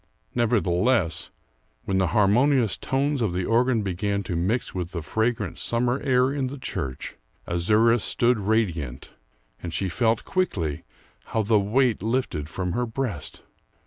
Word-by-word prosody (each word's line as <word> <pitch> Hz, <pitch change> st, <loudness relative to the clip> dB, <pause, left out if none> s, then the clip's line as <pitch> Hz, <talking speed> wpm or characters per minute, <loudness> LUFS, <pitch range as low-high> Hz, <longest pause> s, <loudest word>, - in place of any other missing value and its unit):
Nevertheless, 110 Hz, -3 st, +1 dB, 0.6 s
when 95 Hz, -1 st, +1 dB
the 95 Hz, -, +2 dB
harmonious 110 Hz, -, +3 dB
tones 140 Hz, 0 st, -1 dB
of 105 Hz, -6 st, 0 dB
the 90 Hz, 0 st, -1 dB
organ 120 Hz, -1 st, +2 dB
began 100 Hz, +2 st, -1 dB
to 90 Hz, -2 st, -4 dB
mix 100 Hz, +9 st, -1 dB
with 90 Hz, 0 st, -4 dB
the 85 Hz, -3 st, -4 dB
fragrant 110 Hz, -2 st, -1 dB
summer 120 Hz, +2 st, 0 dB
air 130 Hz, 0 st, +2 dB
in 140 Hz, -2 st, -1 dB
the 140 Hz, +3 st, -6 dB
church, 70 Hz, -, -5 dB, 0.3 s
Azouras 110 Hz, +7 st, +3 dB
stood 120 Hz, -1 st, +2 dB
radiant, 90 Hz, -, -1 dB, 0.5 s
and 85 Hz, -, -5 dB
she 95 Hz, +3 st, -1 dB
felt 115 Hz, +4 st, +1 dB
quickly 90 Hz, -, -1 dB, 0.4 s
how 110 Hz, -, -1 dB
the 105 Hz, 0 st, +3 dB
weight 115 Hz, +2 st, +1 dB
lifted 110 Hz, -, -1 dB
from 90 Hz, +1 st, -3 dB
her 120 Hz, +6 st, -1 dB
breast. 115 Hz, -, -4 dB
110 Hz, 145 wpm, -25 LUFS, 90-125 Hz, 0.6 s, harmonious